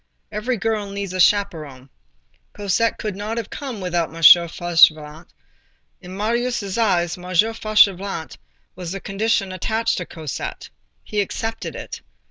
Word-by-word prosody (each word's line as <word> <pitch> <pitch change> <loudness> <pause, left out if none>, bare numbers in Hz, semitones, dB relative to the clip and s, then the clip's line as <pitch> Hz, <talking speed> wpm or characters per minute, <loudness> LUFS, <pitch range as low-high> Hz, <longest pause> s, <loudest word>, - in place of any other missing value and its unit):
Every 235 +4 -2
girl 215 -1 -2
needs 200 -2 -5
a 185 - -3
chaperon. 155 -10 +1 0.6
Cosette 205 +3 0
could 210 -3 -4
not 210 +3 -4
have 230 -3 -4
come 265 -7 -6
without 175 -3 -1
M. - - -14
Fauchelevent. 165 -1 +5 0.7
In 185 0 -9
Marius' 225 -2 -1
eyes, 180 -7 +1
M. 180 - -11 0.3
Fauchelevent 200 -6 +1 0.4
was 175 -2 -6
the 195 - -5
condition 195 0 -1
attached 225 +5 -1
to 180 - -4
Cosette. 155 -4 -6 0.3
He 210 -1 -1
accepted 225 +3 -4
it. - - -7
195 Hz, 130 wpm, -21 LUFS, 175-220 Hz, 0.7 s, Fauchelevent